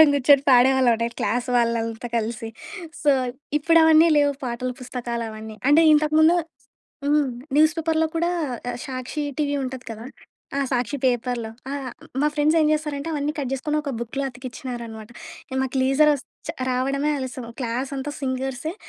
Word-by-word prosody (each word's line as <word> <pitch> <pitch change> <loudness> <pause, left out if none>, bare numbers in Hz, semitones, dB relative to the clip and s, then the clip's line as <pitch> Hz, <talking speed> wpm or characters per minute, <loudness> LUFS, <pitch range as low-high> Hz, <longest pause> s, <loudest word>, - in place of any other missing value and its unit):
అందరం 315 - +10
గూర్చొని 280 0 +5
పాడేవాళ్ళం 255 0 +5
అండి 230 +1 -1
క్లాస్ 245 +4 0
వాళ్ళంతా 230 0 0
కలిసి. 225 0 -2 0.5
సో, 295 - +4 0.5
ఇప్పుడు 330 +3 +4
అవన్నీ 320 +1 +7
లేవు 290 -1 +4
పాటల 250 +1 -3
పుస్తకాలవన్నీ. 230 -3 -5
అంటే 310 +3 +6
ఇంతకుముందు 310 +2 +4 0.7
హ్మ్. 295 -1 +3 0.3
న్యూస్ 310 +2 +5
పేపర్‌లో 320 0 +1
కూడా 340 +1 +1 0.6
సాక్షి 260 +3 -4
టీవీ 285 -1 0
ఉంటది 260 0 -6
కదా! 225 +1 -7 0.5
ఆ! - - +1
సాక్షి 250 +2 0
పేపర్‌లో. 245 -2 -1 0.2
ఆ! - - -3 0.5
మా 300 - +4
ఫ్రెండ్స్ 305 +2 +3
ఏం 305 - +4
జేస్తారంటే, 300 -1 -2
అవన్నీ 295 0 -1
కట్ 270 -3 -2
చేసుకొని 300 +3 -1
ఒక 280 -2 -4
బుక్‌లా 270 +4 -3
అతికిచ్చినారనమాట. 240 -3 -7 0.5
మాకు 265 0 -3
లీజర్ 280 +3 +4
వస్ 270 -2 -7 0.2
చ - - +1 0.2
రావడమే 275 +4 0
ఆలస్యం 260 -2 -5
క్లాస్ 250 +3 -2
అంతా 290 +2 -4
సింగర్సే. 265 +4 -3
265 Hz, 145 wpm, -23 LUFS, 245-300 Hz, 0.7 s, అందరం